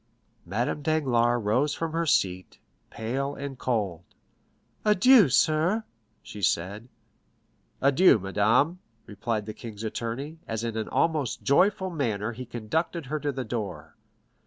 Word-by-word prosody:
Madame 120 +9 -1
Danglars 120 -6 +1
rose 130 +8 +1
from 165 -1 -3
her 165 +1 -1
seat, 95 -8 0 0.3
pale 135 +5 -3
and 140 -2 -7
cold. 100 -9 -1 0.8
"Adieu, 210 - +6
sir," 165 - +2 0.4
she 105 - -9
said. 100 +5 -1 1.0
"Adieu, 140 +3 +6
madame," 105 - +1 0.3
replied 105 +1 -3
the 110 - -6
king's 110 -2 -9
attorney, 120 +8 -4
as 115 0 -3
in 115 -1 -3
an 110 -1 -3
almost 155 -6 0
joyful 190 +6 +3
manner 115 - -1
he 125 +1 -8
conducted 145 +9 -2
her 155 - 0
to 145 -1 -1
the 130 -1 -4
door. 95 -9 -5
120 Hz, 130 wpm, -27 LUFS, 110-155 Hz, 1.0 s, Adieu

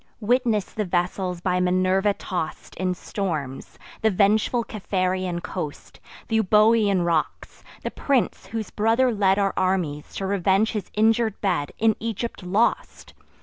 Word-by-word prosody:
Witness 230 -2 +1
the 215 - -1
vessels 180 0 -1
by 180 0 +1
Minerva 185 +2 +2
toss'd 175 -5 -5
In 185 -1 -1
storms; 155 -10 -4 0.2
the 220 - +4
vengeful 215 +4 +2
Capharean 185 -4 -2
coast; 160 -6 -6 0.3
Th' - - -21
Euboean 210 -2 +4
rocks! 165 -2 -2 0.2
the - - -3
prince, 260 -8 0
whose 220 +1 -5
brother 230 +4 +2
led 195 -2 +3
Our 200 -1 +1
armies 180 -6 -1
to 195 - -3
revenge 195 +2 +2
his 210 -4 -4
injur'd 220 0 +2
bed, 175 -8 -1
In 220 -1 +3
Egypt 230 0 -4
lost! 195 +5 -1
195 Hz, 135 wpm, -24 LUFS, 180-220 Hz, 0.3 s, the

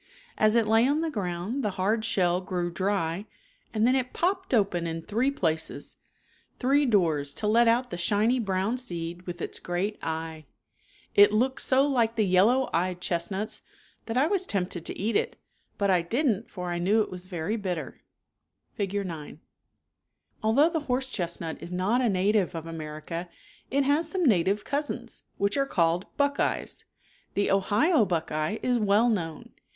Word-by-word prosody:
As 215 +1 +3
it 230 -2 +3
lay 225 +3 +4
on 295 +3 +1
the 325 -1 -1
ground 195 +4 -3
the 210 - +1
hard 215 +4 +1
shell 180 -5 +2
grew 180 -2 -2
dry 190 0 -1 0.4
and 220 0 +1
then 255 +2 +4
it 255 -1 -1
popped 375 +2 -1
open 195 -8 +2
in 165 0 -4
three 230 +8 +1
places, 160 - -2 0.6
three 275 +2 +3
doors 160 - +1
to 215 - -1
let 230 +3 +4
out 245 +1 +2
the 175 - -4
shiny 215 +7 +2
brown 200 +2 0
seed 175 -6 -4
with 175 0 -5
its - - -3
great 185 +4 -2
eye. 160 -2 -5 0.7
It 205 0 +7
looked 255 +5 +1
so 270 +1 +4
like 235 -5 +1
the 220 -2 +2
yellow 210 +8 +4
eyed 180 +1 0
^x^^v. - - -27
chestnuts, 190 +5 -2 0.5
that 225 +1 -2
I 260 - +5
?"^&\^^. 320 - -2
was 385 -2 +1
tempted 180 -4 -2
to - - -3
\:%^^^^^^ - - -11
eat 215 +2 -1
it, - - 0 0.4
but 200 -1 +2
I 180 -2 +4
did 235 - -1
'^^^ - - +5
n't 225 - -14
for 180 -2 -5
I 175 - -2
knew 205 +5 +3
it - - -10
was 180 0 -7
very 175 +3 -2
bitter 180 - -4 0.7
(Fig. 200 0 -2
9). 160 -4 -7 1.0
Although 250 +9 +4
the 330 -1 -1
horse 260 +1 0
chestnut 170 -5 -4
is 170 - -8
not 190 +8 +1
a 245 - +2
native 195 -1 +1
of 165 -1 -5
America 165 +1 -6 0.4
it 275 +1 +1 0.2
some 360 +3 -1
native 200 - +2
cousins, 280 -4 -3
which 200 +6 +1
called 170 +1 +1
buckeyes. 285 0 0 0.5
The 200 - +1
Ohio 215 - +3
buck 170 -3 -1
eye 155 +7 -1
is 250 -1 +2
well 210 +2 +3
known. 165 -9 -2
200 Hz, 175 wpm, -27 LUFS, 175-240 Hz, 1.0 s, It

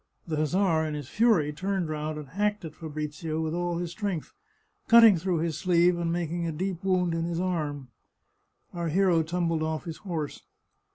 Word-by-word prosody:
The 155 -3 -3
hussar, 160 +1 +2
in 155 -1 -3
his 145 -3 -6
fury, 210 -10 +3
turned 190 +2 -2
round 155 0 -3
and 150 -3 -8
hacked 205 +3 -1
at 155 - -7
Fabrizio 155 0 -4
with 160 0 -2
all 175 0 -1
his 175 -1 -3
strength, 195 -5 -4 0.5
cutting 230 -3 +8
through 180 +1 -1
his 160 -2 -2
sleeve 175 0 +4
and 170 -1 -1
making 170 0 -2
a - - -1
deep 180 +3 -3
wound 180 -3 +1
in 165 0 -1
his 170 0 -2
arm. 150 -7 -2 0.8
Our 170 -1 -3
hero 175 0 +3
tumbled 165 0 -1
off 155 0 -2
his 165 -2 -6
horse. 165 -7 -4
170 Hz, 180 wpm, -27 LUFS, 155-180 Hz, 0.8 s, cutting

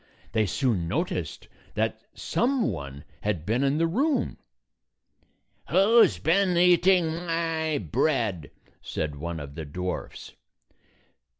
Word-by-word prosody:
They 110 -2 +1
soon 100 -5 0
noticed 165 - -3 0.3
that - - -1
some 255 -1 0
one 70 0 -7 0.2
had 95 -6 -2
been 115 +7 +1
in 140 +2 +2
the 165 - +2
room. 260 - 0 1.3
"Who 200 +8 +6
's 95 - +1
been 180 - +2
eating 180 0 +5
my 165 -2 -1
bread?" 105 - -1 0.3
said 75 -2 -4
one 85 +2 -4
of 70 -1 -8
the 80 - -6
dwarfs. 90 +5 -5
140 Hz, 115 wpm, -26 LUFS, -, 1.3 s, Who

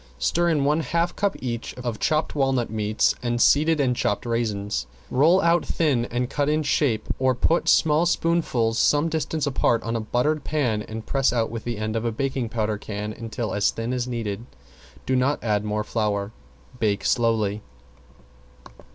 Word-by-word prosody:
Stir 175 - +1
in 150 -4 +1
one 150 +2 +2
half 170 +3 -1
cup 200 -1 0
each 120 -2 -4
of 120 -3 -4
chopped 155 -1 0
walnut 135 -5 0
meats 110 0 +1
and 120 -1 -1
seeded 155 +5 +4
and 130 -3 +2
chopped 105 -1 -1
raisins. 105 - -2 0.2
Roll 160 +8 +4
out 170 +1 +3
thin 140 -8 +1
and 120 +1 -2
cut 145 +2 -1
in 155 +1 +1
shape 140 -6 +1
or 130 -1 +2
put 165 +7 +1
small 160 +2 +4
spoonfuls 155 -10 +1
some 150 +2 +3
distance 160 -1 -2
apart 120 -4 +1
on 115 0 -2
a - - 0
buttered 125 +8 0
pan 125 -9 0
and 110 +1 -7
press 135 -3 +1
out 115 -2 0
with 115 -2 -6
the 120 -2 -3
end 110 +1 -3
of 115 - -1
a 115 - 0
baking 130 0 -2
powder 110 -2 -1
can 105 0 -5
until 115 0 -4
as 100 -1 +2
thin 115 +2 -3
as 125 -1 -2
needed; 115 -2 -4 0.6
do 130 - +1
not 130 +3 +2
add 105 -3 +1
more 105 0 -1
flour. 105 -2 -1 0.5
Bake 105 -3 0
slowly. 110 -3 +1
120 Hz, 175 wpm, -24 LUFS, 110-145 Hz, 0.6 s, seeded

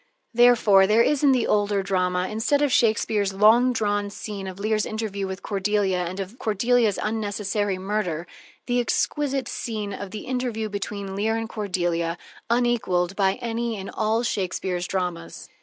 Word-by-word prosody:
Therefore, 225 -5 +5
there 220 +3 +5
is 295 +2 +1
in 280 - +6
the 255 -3 +2
older 205 -1 +1
drama, 185 -1 0
instead 225 +8 +1
of 285 - +2
Shakespeare's 215 -4 +2
long 225 +6 +5
drawn 205 -3 0
scene 200 -1 -6
of 185 -1 -7
Lear's 215 +1 0
interview 215 -3 -3
with 190 +1 -6
Cordelia 195 -2 0
and 185 +3 -5
of 195 +6 -6
Cordelia's 225 0 +2
unnecessary 205 -2 -1
murder, 185 -4 -2 0.4
the 245 0 +1
exquisite 270 +1 0
scene 215 -3 -4
of 200 0 -6
the 215 +2 -7
interview 245 -4 -2
between 200 -1 -5
Leir 220 +3 0
and 225 0 -3
Cordelia, 175 -6 -1 0.3
unequaled 230 -7 +1
by 195 -1 +2
any 230 -1 -2
in 195 0 -7
all 220 +2 0
Shakespeare's 185 -4 -2
dramas. 180 -3 -4
205 Hz, 155 wpm, -24 LUFS, 190-225 Hz, 0.4 s, in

